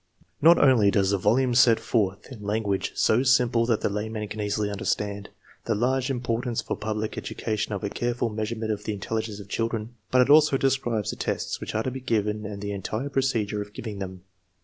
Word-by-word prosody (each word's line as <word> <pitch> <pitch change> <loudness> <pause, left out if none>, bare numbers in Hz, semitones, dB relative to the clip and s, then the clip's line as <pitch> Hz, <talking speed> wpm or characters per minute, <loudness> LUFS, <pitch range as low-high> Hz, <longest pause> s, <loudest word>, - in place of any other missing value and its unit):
Not 170 +3 +7
only 125 -7 +5
does 100 -1 +2
the 100 - +1
volume 120 +6 +2
set 120 -2 +5
forth, 105 0 -1
in 120 -5 -9
language 105 -1 -1
so 110 +3 +3
simple 125 -3 +3
that 115 -3 +1
the - - +1
layman 105 +1 -3
can 105 0 -5
easily 105 0 -1
under 100 - -5
stand, 100 -1 -2 0.4
the 115 - 0
large 130 +4 +1
importance 120 -2 -1
for - - -2
public 110 0 -3
education 110 -1 -3
of 100 - -4
a 100 - -1
careful 120 0 -1
measurement 110 +1 -3
of 105 -1 -3
the 110 - -2
intelligence 110 +1 -3
of 100 - -10
children, 115 +1 -2 0.2
but 125 0 +5
it 130 - -3
also 150 -2 +6
describes 120 -6 0
the - - -6
tests - - -3
which - - -5
are 110 - +1
to 130 - -2
be 130 - -5
given 105 -3 -1
and 100 -1 -7
the 100 - -3
entire 110 +7 -3
pro 135 -1 +1
cedure 105 -5 -1
of 105 0 -8
giving 105 -3 -6
them. 95 -2 -7
110 Hz, 215 wpm, -26 LUFS, 105-120 Hz, 0.4 s, Not